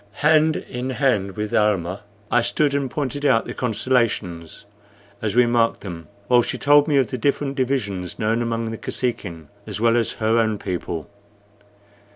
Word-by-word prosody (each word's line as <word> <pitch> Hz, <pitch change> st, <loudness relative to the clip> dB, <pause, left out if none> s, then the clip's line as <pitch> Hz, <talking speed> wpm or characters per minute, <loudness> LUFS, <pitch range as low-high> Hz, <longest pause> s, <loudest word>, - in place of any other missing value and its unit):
Hand 155 Hz, 0 st, +5 dB
in 125 Hz, +1 st, -5 dB
hand 125 Hz, -8 st, 0 dB
with 105 Hz, 0 st, -3 dB
Almah 95 Hz, -4 st, +1 dB, 0.3 s
I 120 Hz, -, +4 dB
stood 145 Hz, +4 st, +1 dB
and 140 Hz, -2 st, 0 dB
pointed 145 Hz, +1 st, -3 dB
out 130 Hz, -6 st, +3 dB
the -, -, -6 dB
constellations 110 Hz, -9 st, -1 dB, 0.6 s
as 105 Hz, -2 st, -2 dB
we 125 Hz, 0 st, +6 dB
marked 120 Hz, -1 st, +1 dB
them 85 Hz, -5 st, -8 dB, 0.2 s
while 125 Hz, -1 st, +5 dB
she -, -, -3 dB
told 145 Hz, +1 st, +5 dB
me 145 Hz, -3 st, +2 dB
of 135 Hz, -, +4 dB
the 130 Hz, 0 st, -5 dB
different 140 Hz, +2 st, 0 dB
divisions 110 Hz, -10 st, -2 dB
known 110 Hz, +2 st, 0 dB
among 115 Hz, -1 st, -2 dB
the 115 Hz, -, -6 dB
Kosekin 90 Hz, -11 st, -4 dB, 0.2 s
as 105 Hz, -1 st, -5 dB
well 115 Hz, +1 st, +3 dB
as 115 Hz, -2 st, 0 dB
her 110 Hz, +1 st, +1 dB
own 110 Hz, -2 st, +1 dB
people. 90 Hz, -4 st, -4 dB
115 Hz, 170 wpm, -22 LUFS, 105-130 Hz, 0.6 s, we